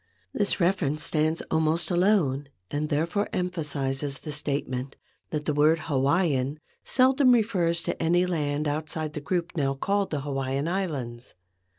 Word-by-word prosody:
This 205 - 0
reference 170 -5 +1
stands 155 +1 +1
almost 160 +2 +1
alone, 175 -7 +2 0.2
and 150 +1 -1
therefore 170 +7 0
empha¬ 180 -2 -2
sizes 140 -1 -2
the 155 - -6
statement 140 -3 -2 0.3
that 150 -1 -3
the 150 - +1
word 155 +2 +4
Hawaiian 145 -1 +1 0.2
seldom 260 0 +4
refers 180 -7 +1
to - - -3
any 175 +2 +3
land 150 -4 -1
outside 155 +1 -3
the 150 - -5
group 170 +3 -1
now 135 -3 0
called 200 +7 0
the 150 -3 -2
Hawaiian 135 +1 -2
Islands. 135 - -3
155 Hz, 145 wpm, -26 LUFS, 140-175 Hz, 0.3 s, word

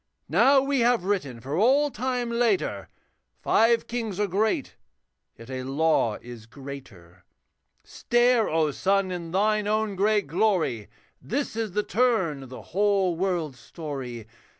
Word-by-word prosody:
Now 250 - +5
we 275 0 0
have 235 -4 +3
written 180 -11 -2
for 135 +5 -4
all 270 - +3
time 250 0 -2
later, 240 +10 0 0.5
Five 230 +1 +3
kings 225 -5 -4
are 210 - +2
great, 205 +3 -1 0.6
yet 115 +3 -11
a 130 0 -4
law 135 -4 +1
is 120 -2 -10
greater. 115 -11 -11 0.6
Stare, 240 -1 +2
O 155 -1 +1
sun! 195 +4 +1
in 175 -2 -5
thine 210 +3 +1
own 215 -1 0
great 205 +1 +2
glory, 165 - 0 0.3
This 275 0 -3
is 225 -4 -3
the 210 +1 0
turn 215 - +1
of 135 - -11
the 130 - -9
whole 195 -2 +2
world's 165 -7 -2
story. 130 -5 -7
195 Hz, 140 wpm, -26 LUFS, 140-225 Hz, 0.6 s, Now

